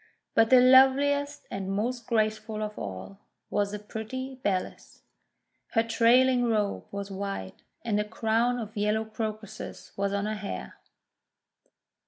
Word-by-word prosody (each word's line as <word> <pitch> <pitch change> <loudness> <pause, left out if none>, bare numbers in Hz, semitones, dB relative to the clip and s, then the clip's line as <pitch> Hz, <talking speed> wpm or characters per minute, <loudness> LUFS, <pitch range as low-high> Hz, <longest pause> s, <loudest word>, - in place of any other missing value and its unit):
But 225 0 +4
the 255 - +8
loveliest 280 +3 +5
and 195 0 -3
most 235 +4 -2
graceful 215 -1 0
of 210 0 -5
all, 100 - -7 0.3
was 205 -1 0
the 210 - -3
pretty 220 +5 -6
Bellis. 190 -5 -3 0.7
Her 225 - +4
trailing 245 +2 +4
robe 210 -3 0
was 200 0 -5
white, 195 - -5 0.2
and 210 -3 +1
a - - +2
crown 225 +3 0
of 215 -3 -6
yellow 210 +1 0
Crocuses 215 -1 -6
was 200 0 -1
on 200 0 -1
her 215 - -1
hair. 205 - -6
215 Hz, 135 wpm, -28 LUFS, 205-240 Hz, 0.7 s, the